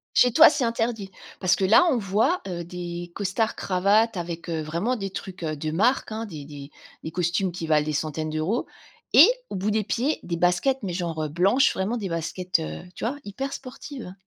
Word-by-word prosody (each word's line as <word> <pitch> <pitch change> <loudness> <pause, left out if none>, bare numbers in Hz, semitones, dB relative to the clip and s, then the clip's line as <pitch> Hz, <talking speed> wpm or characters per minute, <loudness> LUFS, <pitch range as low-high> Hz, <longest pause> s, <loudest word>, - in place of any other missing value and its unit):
Chez 245 -2 +5
toi 320 +3 +9
c'est 260 -5 0
interdit? 225 -3 -2 0.3
Parce 180 -2 +3
que 195 - -2
là 225 - +6
on 265 - +2
voit, 220 - +1
heu, 175 -2 -4
des 175 0 -6
costards 205 +3 -1
cravates 200 +3 +2
avec, 170 0 -5
heu, 160 -1 -1
vraiment 170 +11 -1
des 195 -2 -4
trucs, 185 -2 -8
heu, 155 -1 -2
de 155 +1 -4
marque, 220 +9 +1
hein, 220 +1 -3
des 155 -9 -8
des 145 -1 -10 0.3
des 160 - -5
costumes 180 +2 0
qui 170 -2 -5
valent 150 -1 +2
des 155 - -2
centaines 155 +1 -2
d'euros 155 +10 -1 0.5
et 310 +9 +10 0.2
au - - -5
bout 200 +3 -1
des 215 0 +1
pieds, 255 +8 -1
des 170 -1 -3
baskets, 180 +10 +2
mais 180 -3 -3
genre, 170 -3 -3
heu, - - -1
blanches, 195 - +3
vraiment 200 +6 -1
des 205 -4 -3
baskets, 170 +2 -1
heu, 160 - -5
tu - - -8
vois, 275 +5 -2
hyper 270 +7 -4
sportives. 255 -5 -8
185 Hz, 210 wpm, -25 LUFS, 170-225 Hz, 0.5 s, et